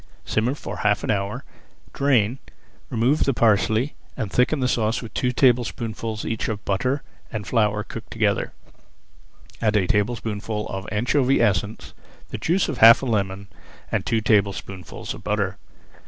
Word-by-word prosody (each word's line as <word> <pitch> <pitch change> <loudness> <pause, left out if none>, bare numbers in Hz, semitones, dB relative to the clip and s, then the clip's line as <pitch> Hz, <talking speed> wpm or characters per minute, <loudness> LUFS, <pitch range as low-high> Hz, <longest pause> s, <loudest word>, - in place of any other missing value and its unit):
Simmer 120 +5 0
for - - -7
half 105 -1 +1
an - - 0
hour, 100 -1 -2 0.5
drain, 130 -3 +2 0.5
remove 125 +6 +2
the 140 - +1
parsley 110 +4 +2 0.2
and 105 -3 -3
thicken 130 +4 +2
the 130 - +1
sauce 115 -2 +1
with 115 - -9
two 125 - 0
tablespoonfuls 115 -3 0
each 115 0 -2
of 105 -1 -5
butter 130 +8 0 0.3
and 110 -3 -4
flour 105 -2 +1
cooked - - -9
together. - - 0 1.1
Add 110 -2 +2
a 95 - +2
tablespoonful 105 +1 -1
of 95 0 -5
anchovy 125 +5 +2
essence, 105 -1 0 0.4
the - - -5
juice 180 +4 +1
of 150 - -4
half 115 +3 +8
a - - -1
lemon, 100 -4 -1 0.5
and - - 0
two 115 -1 0
tablespoonfuls 100 -4 -1
of - - -11
butter. 100 -2 -1
110 Hz, 150 wpm, -23 LUFS, 105-125 Hz, 1.1 s, half